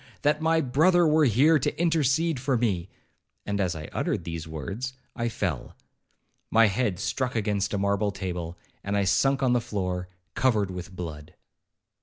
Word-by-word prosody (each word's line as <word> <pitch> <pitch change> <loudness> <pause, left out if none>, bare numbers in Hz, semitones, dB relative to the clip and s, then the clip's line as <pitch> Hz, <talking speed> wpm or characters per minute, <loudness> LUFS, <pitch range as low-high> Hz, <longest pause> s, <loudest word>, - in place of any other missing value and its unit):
that 150 +1 +2
my 160 0 +3
brother 165 +6 +4
were 155 0 +4
here 145 +7 +4
to 130 - -2
intercede 160 -2 +2
for 130 0 +1
me,'—and, 100 -1 -4
as 90 -2 0
I 80 -1 -6
uttered - - -1
these 80 -1 -5
words, 100 - -5 0.2
I 120 -1 -1
fell. 90 - -3 0.7
My 115 0 +5
head 105 -2 0
struck 125 +4 -2
against 105 -2 0
a - - 0
marble 100 +1 +1
table, 90 -3 -5 0.3
and 100 +1 -1
I 100 - +2
sunk 135 +9 +2
on 125 -2 +3
the 120 - +2
floor 90 -4 -3 0.3
covered 110 -7 +1
with 90 -1 -6
blood. 80 -4 -7
105 Hz, 160 wpm, -26 LUFS, 90-135 Hz, 0.7 s, My